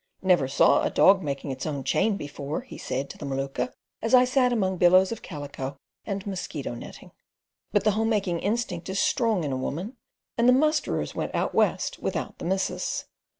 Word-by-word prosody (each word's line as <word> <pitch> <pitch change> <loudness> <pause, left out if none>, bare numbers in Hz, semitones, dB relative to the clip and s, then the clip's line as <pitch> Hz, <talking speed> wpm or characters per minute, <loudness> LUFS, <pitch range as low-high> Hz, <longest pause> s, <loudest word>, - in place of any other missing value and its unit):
"Never 180 -8 +4
saw 135 - +4
a - - +1
dog 190 0 +5
makin', 140 -2 -3
its 130 +3 -4
own 140 -3 -3
chain 210 - +1
before," 145 - -5
he 255 - -11
said 135 +2 -3
to - - -13
the 150 - -6
Maluka 135 - -2 0.3
as 225 +3 +4
I 250 0 +7
sat 255 0 +2
among 190 -5 0
billows 185 +3 +5
of 230 - -5
calico 145 -4 -6 0.3
and 195 -2 -4
mosquito 175 -9 -4
netting. 120 - -10 0.6
But 205 - +2
the 215 - +4
homemaking 205 -5 0
instinct 200 -5 -2
is 190 - -2
strong 225 -8 +2
in 145 - -2
a 130 - -1
woman, 175 - -4 0.4
and 240 +1 +5
the - - +7
musterers 305 +3 +1
went - - -3
out - - 0
west - - +1
without - - -3
the - - -6
missus. 190 +2 -1
190 Hz, 190 wpm, -26 LUFS, 145-225 Hz, 0.6 s, I